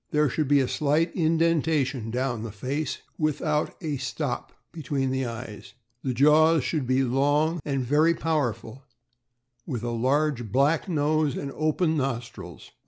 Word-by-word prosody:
There 150 -1 +2
should 155 +1 -1
be 145 0 +4
a 130 - 0
slight 155 +5 0
indentation 160 - +1
down 125 -1 -2
the 115 -1 -5
face, 135 +9 -4 0.2
without 155 0 0
a 150 -4 -2
"stop" 135 0 -4 0.2
between 140 -4 -2
the 130 -1 -1
eyes. 115 -2 -8 0.3
The 130 - -2
jaws 155 +3 +5
should 145 -4 -2
be 130 +1 +2
long 145 +6 +1
and 135 -3 -2
very 155 +6 +3
powerful, 135 -7 -2 0.9
with 125 -8 -4
a 120 - -2
large 130 -1 0
black 145 - +2
nose 155 -2 +1
and 140 - -4
open 155 +2 0
nostrils. 120 - -5
140 Hz, 145 wpm, -26 LUFS, 125-155 Hz, 0.9 s, jaws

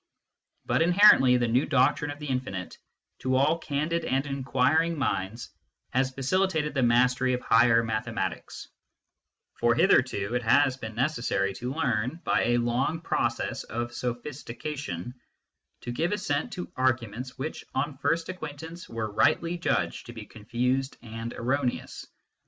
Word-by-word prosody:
But - - +1
inherently, 170 -8 +6
the 120 -1 +1
new 125 +4 +2
doctrine 135 +3 +2
of 145 - -6
the 150 - -8
infinite, 125 -9 -3 0.4
to 130 0 0
all 150 +5 +3
candid 155 +2 -1
and 135 -2 0
inquiring 140 +4 +1
minds, 115 -4 -2 0.4
has 130 +1 +1
facilitated 150 +3 0
the 135 - 0
mastery 125 +1 +3
of 125 - -5
higher 115 0 +4
mathematics; 110 -1 -4 0.9
for 120 0 +3
hitherto, 125 - +2
it 125 - +1
has 130 +3 +4
been 110 -4 -8
necessary 115 -7 0
to 125 +6 -5
learn, 130 -1 -1
by - - +2
a 120 +1 +2
long 120 +7 0
process - - -1
of 120 +1 -4
sophistication, 125 - -5 0.7
to 120 - -5
give 170 +10 -1
assent 145 -8 -1
to 180 0 -6
arguments 130 0 -1
which, 145 +4 -5
on 145 -2 -2
first 165 +4 0
acquaintance, 160 -1 -8
were 110 -2 -4
rightly 165 +10 +2
judged 170 - -1
to 120 - -8
be 110 -3 -8
confused 125 +5 -2
and 115 0 -6
erroneous. 130 +1 -2
130 Hz, 140 wpm, -27 LUFS, 120-150 Hz, 0.9 s, inherently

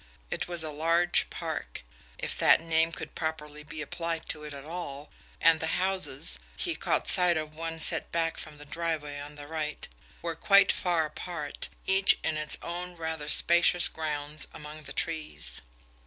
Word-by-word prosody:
It - - -3
was 175 -2 +2
a 155 - -5
large 165 +3 +1
park, - - -6 0.3
if - - -4
that - - +5
name 165 0 0
could - - -8
properly 150 -2 -5
be 150 +1 -7
applied 165 +2 -5
to 150 - -3
it 150 - -8
at 140 0 -11
all, 155 -4 -8 0.3
and 165 -1 +4
the 160 0 -2
houses 150 - +5 0.2
he - - -3
caught - - -1
sight 180 -2 +9
of 155 -1 -5
one 165 +1 -6
set - - +1
back 165 -1 -2
from 150 -1 -9
the 145 - -11
driveway 150 -2 -4
on 145 +1 -10
the 145 0 -10
right 150 0 -5 0.4
were 170 -1 -2
quite 195 +4 +4
far 170 -3 0
apart, 155 -1 -6 0.2
each 190 0 +4
in 160 - -1
its 155 -1 +4
own 175 +1 -6
rather 160 -2 -5
spacious 175 +3 +4
grounds 150 -1 -1
among 150 0 -10
the 135 - -8
trees. 155 - -3
160 Hz, 170 wpm, -28 LUFS, 150-170 Hz, 0.4 s, sight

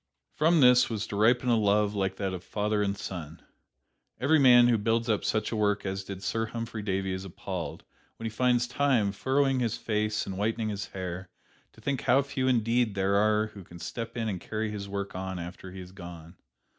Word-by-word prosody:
From 160 +1 +3
this 125 0 +6
was 110 -3 -2
to - - -6
ripen 120 +4 +3
a 120 - +5
love 105 -1 +2
like 95 -2 -1
that 95 -1 -2
of 90 -1 -6
father 105 0 -1
and 100 -1 0
son. 85 -5 -7 0.8
Every 150 +4 +4
man 125 -3 +7
who 120 -2 +3
builds 115 +2 +1
up 105 -2 +1
such 110 -1 0
a - - -1
work 105 -1 +1
as 95 0 -3
did 95 0 -8
Sir 115 +1 -1
Humphry 115 0 -5
Davy 95 -2 -1
is 95 0 -4
appalled, 95 -3 -6 0.3
when 115 - -7
he 110 - -2
finds 125 +1 +2
Time 125 -6 +2
furrowing 135 +5 +1
his 115 -3 0
face 105 -1 -1
and 95 0 -5
whitening 110 +1 0
his 100 -1 -4
hair, 90 -1 -6 0.4
to - - -17
think 140 -3 -1
how 135 +2 +4
few 130 -1 -2
indeed 115 -2 +2
there 95 0 +1
are 105 +1 +2
who 100 - -10
can 85 0 -13
step 115 +7 -6
in 115 -1 -1
and 95 -5 -3
carry 110 0 -3
his 100 -1 -6
work 100 0 -4
on 95 0 -4
after 90 +2 -8
he 95 0 -8
is 90 0 -11
gone. 85 -2 -10
105 Hz, 210 wpm, -28 LUFS, 95-115 Hz, 0.8 s, man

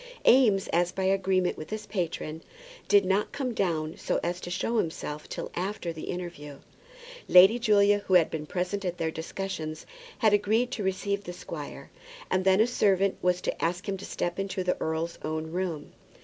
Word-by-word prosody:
Eames, 220 -7 +5
as 175 +1 +2
by 190 +1 -3
agreement 190 -1 +2
with 155 - -8
his 215 0 -5
patron, 165 -5 -3 0.5
did 200 -1 +5
not 195 +3 +1
come 260 -4 -3
down 160 -6 -1
so - - -1
as 175 +1 -2
to - - -6
show 225 +6 0
himself 150 -3 -4
till - - -5
after 180 -1 -3
the 160 - -7
interview. 170 -5 -6 0.7
Lady 190 +6 +8
Julia, 205 -3 +4
who 185 - +4
had 170 -3 +5
been 155 -1 -4
present 185 +4 -2
at 180 -1 -3
their 165 -2 -1
discussions, 160 -1 -5 0.3
had 215 -3 +3
agreed 220 +4 +2
to 225 - -3
receive 200 +1 -1
the 175 - -6
squire; - - -8 0.4
and 185 - +2
then 190 0 +5
a 220 - +6
servant 195 -5 +2
was 180 0 +1
to - - -3
ask 180 +4 -1
him 200 - -1
to 190 - -10
step 175 +2 -3
into 195 -1 -2
the 180 - +1
earl's 160 +1 -2
own 155 +1 -3
room. 175 -4 -3
185 Hz, 185 wpm, -28 LUFS, 170-200 Hz, 0.7 s, Lady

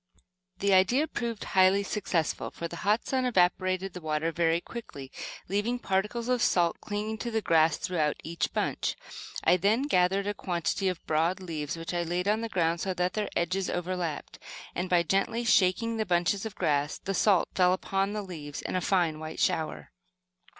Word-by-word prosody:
The 200 -1 +2
idea 195 +11 +4
proved 235 -7 -4
highly 190 +1 +4
successful, 185 -6 -1
for 170 - -5
the 170 - -8
hot 210 +4 +1
sun 260 -1 0
evaporated 185 -3 +1
the 180 - -7
water 155 +1 -1
very 165 0 +2
quickly, 145 - -9 0.4
leaving 205 +5 0
particles 210 +2 -1
of 250 -1 +1
salt 175 -6 +2
clinging 215 +1 -3
to 240 - -3
the 225 -1 0
grass 165 -5 +3
throughout 160 -5 0
each 170 +1 -2
bunch. - - -1 0.5
I 180 - +5
then 210 +8 +2
gathered 195 -6 +2
a 205 - -1
quantity 180 +1 -1
of 180 -2 -3
broad 165 +4 +1
leaves 160 -4 -4
which 165 +1 -5
I 175 - 0
laid 175 +2 -2
on 215 +2 +2
the 230 - -3
ground 170 -3 +1
so 190 -1 -2
that 180 0 0
their 215 -1 -2
edges 185 +2 0
over 180 +1 -2
lapped, 165 -5 -4 0.3
and 180 +1 -3
by 175 -1 +4
gently 195 +7 0
shaking 225 +1 +3
the 220 - 0
bunches 180 +4 +1
of 210 - -10
grass 145 0 0
the 195 - -4
salt 195 -1 +3
fell 180 -1 +4
upon 195 +2 0
the 210 -1 -3
leaves 150 -6 -7
in - - -3
a 185 - +1
fine 170 -4 +1
white 155 0 -7
shower. 160 -1 -1
185 Hz, 185 wpm, -28 LUFS, 170-205 Hz, 0.5 s, I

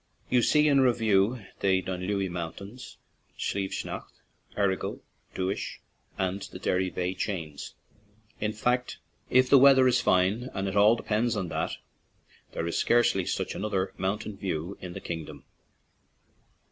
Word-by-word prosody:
You 125 - +5
see 150 +5 +4
in 140 -2 +5
review 115 -3 +2
the 95 -1 +3
Dunlewy 95 +2 -2
Mountains, 100 +8 -7 0.4
Slieve 95 -1 -2
Snaght, - - -5 0.5
Errigal, 100 -2 0 0.4
Dooish, 95 +1 -3 0.4
and 95 +1 -1
the - - -8
Derry 95 0 0
veigh 90 +1 -2
chains; 85 -7 -5 0.6
in 105 0 0
fact, 125 +3 -1 0.3
if 130 0 +5
the 140 +1 +7
weather 135 -1 +7
is 125 0 +3
fine 100 +8 +2
— - - -23
and 95 0 -1
it 95 - -3
all 105 +3 +6
depends 115 +1 0
on 95 -4 -2
that 80 +1 -2 0.4
— - - -32
there 85 - -2
is 85 - -1
scarcely 120 -6 +3
such - - -2
another 100 -2 -2
mountain 100 +2 -3
view 90 0 -3
in 90 -1 -7
the - - -7
kingdom. 80 -3 -6
100 Hz, 145 wpm, -28 LUFS, 95-120 Hz, 0.6 s, the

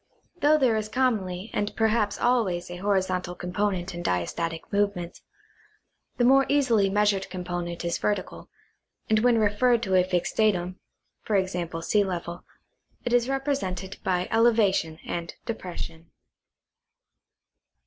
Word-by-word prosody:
Though 305 -1 +5
there 255 -6 +3
is 215 -1 -2
commonly 215 -6 -1
and 205 0 -2
perhaps 220 -2 +1
always 190 -9 +1
a 175 - -6
horizontal 185 -2 0
com 180 0 -7
ponent 195 -2 -1
in 175 - -5
diastatic 165 - -2
movement, 200 -4 -1 1.0
the 245 - +2
more 270 +2 +5
easily 235 -9 +3
measured 205 -1 +1
compo 180 -1 -4
nent 170 0 -5
is 170 - -1
vertical, 205 -3 -3 0.6
and 215 - +5
when 240 +1 +4
referred 225 +3 +2
to 190 -4 -1
a 185 -1 +5
fixed 180 -1 -1
datum 185 -4 +1 0.5
[e. 195 -3 +3
g. 175 -2 -4
sea 205 +4 +3
level) 175 -2 -5 0.6
it 245 - -1
is 245 +1 +3
represented 270 -10 -2
by 180 -1 0
elevation 220 -8 +3
and 170 -1 -4
depression. 170 -6 -6
195 Hz, 135 wpm, -26 LUFS, 180-225 Hz, 1.0 s, Though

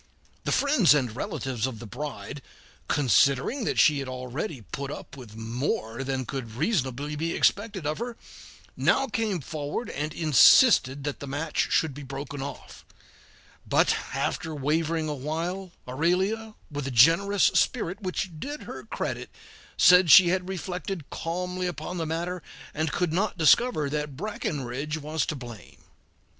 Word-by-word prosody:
The - - 0
friends 275 - +4
and 125 -6 -1
relatives 130 -2 -2
of 125 -4 -6
the 120 - -9
bride, 145 +3 -6 0.5
considering 140 - +2
that - - -1
she 150 -2 +5
had 135 - -4
already 130 - -5
put 140 -1 -4
up 145 - -8
with 120 -6 -11
more 115 +1 -3
than 130 -1 -2
could 115 -3 -6
reasonably 145 - -1
be 165 +3 -2
expected 205 -5 +1
of 150 +4 -2
her, 235 0 -5 0.6
now 270 - +2
came 210 - -2
forward 150 - -4
and 150 +2 -3
insisted 150 - +5
that 145 0 -4
the 140 - -7
match 145 +3 -1
should 160 -3 +2
be 145 - -9
broken 140 +1 -6
off; 140 - -8 0.9
but - - +4 0.2
after 160 -1 -2
wavering 155 +3 0
awhile, 165 +6 -3 0.2
Aurelia, 190 - 0 0.2
with 145 -2 -4
a - - -1
generous 165 - +4
spirit 185 +5 0
which 185 -1 -3
did 290 - -6
her - - -8
credit, - - -4 0.5
said 180 -1 +7
she 175 +4 +9
had 185 +1 -1
reflected 180 -3 -5
calmly 180 +2 -3
upon 175 +1 -5
the 165 - -2
matter, 170 +3 -3 0.3
and 155 0 -1
could 175 -3 -1
not 195 +3 0
discover 165 - +4
that 150 -1 -3
Breckinridge 150 - -3
was 155 0 -2
to 155 - -2
blame. 120 -5 -11
155 Hz, 150 wpm, -26 LUFS, 135-180 Hz, 0.9 s, she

